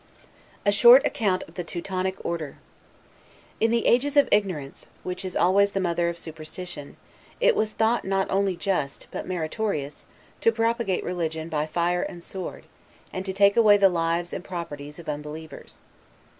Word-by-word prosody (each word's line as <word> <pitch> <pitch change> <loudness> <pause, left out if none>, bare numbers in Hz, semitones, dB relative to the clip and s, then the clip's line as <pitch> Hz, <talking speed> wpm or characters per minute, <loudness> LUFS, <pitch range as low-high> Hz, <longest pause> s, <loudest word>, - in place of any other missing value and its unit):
A 205 - +5
SHORT 240 +6 +8
ACCOUNT 190 -4 0
OF 160 - -16
THE 180 - -4
TEUTONIC 185 +2 -4
ORDER 160 -4 -3 1.0
In 225 - +3
the 235 0 +1
ages 285 +4 +3
of 285 - +6
ignorance, 180 -10 -1 0.2
which 180 +1 -4
is 185 - -5
always 200 +3 +3
the 195 - 0
mother 170 -2 +1
of 170 - -5
superstition, 160 -1 -7 0.4
it - - +4
was 215 0 0
thought 225 +2 +1
not 190 0 0
only 195 -1 +1
just, 170 -6 -2
but - - -5
meritorious, 165 -3 -3 0.4
to 230 - +4
propagate 230 -4 0
religion 160 -2 -3
by 150 -1 -1
fire 175 +2 0
and 175 -1 -6
sword, 190 0 -7 0.5
and 185 - -3
to - - -1
take 200 +1 +4
away 215 -3 +6
the 195 -1 +5
lives 170 0 -1
and - - -5
properties 150 -5 -7
of 170 -2 -11
unbelievers. 150 +1 -7
185 Hz, 160 wpm, -25 LUFS, 165-205 Hz, 1.0 s, SHORT